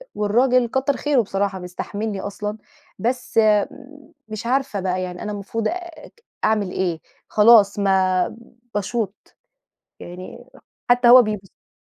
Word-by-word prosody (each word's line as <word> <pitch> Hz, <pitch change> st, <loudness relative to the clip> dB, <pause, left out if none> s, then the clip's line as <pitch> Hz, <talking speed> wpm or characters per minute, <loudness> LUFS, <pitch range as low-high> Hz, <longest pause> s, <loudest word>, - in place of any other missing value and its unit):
والراجل 240 Hz, +4 st, +2 dB
كتر 265 Hz, +3 st, 0 dB
خيره 290 Hz, -4 st, +2 dB
بصراحة 195 Hz, -1 st, -2 dB
بيستحملني 200 Hz, +3 st, -5 dB
أصلًا، 210 Hz, +1 st, -5 dB, 0.4 s
بس 245 Hz, +1 st, -1 dB, 0.9 s
مش 215 Hz, +2 st, -6 dB
عارفة 260 Hz, -4 st, 0 dB
بقى 185 Hz, -1 st, -1 dB
يعني، 180 Hz, -1 st, -6 dB
أنا 210 Hz, -, -4 dB
المفروض 205 Hz, +2 st, -3 dB
آآ، 345 Hz, -1 st, -5 dB, 0.5 s
أعمل 210 Hz, -4 st, +1 dB
إيه، 175 Hz, -4 st, -2 dB, 0.3 s
خلاص 210 Hz, -2 st, +5 dB
ما 190 Hz, -2 st, +2 dB, 0.5 s
باشوط 210 Hz, 0 st, -4 dB, 0.6 s
يعني، 185 Hz, +8 st, -10 dB, 0.4 s
حتى 245 Hz, 0 st, +4 dB
هو 250 Hz, +1 st, +10 dB
بيبص 215 Hz, -3 st, -2 dB
لي. -, -, -54 dB
210 Hz, 120 wpm, -21 LUFS, 195-245 Hz, 0.9 s, هو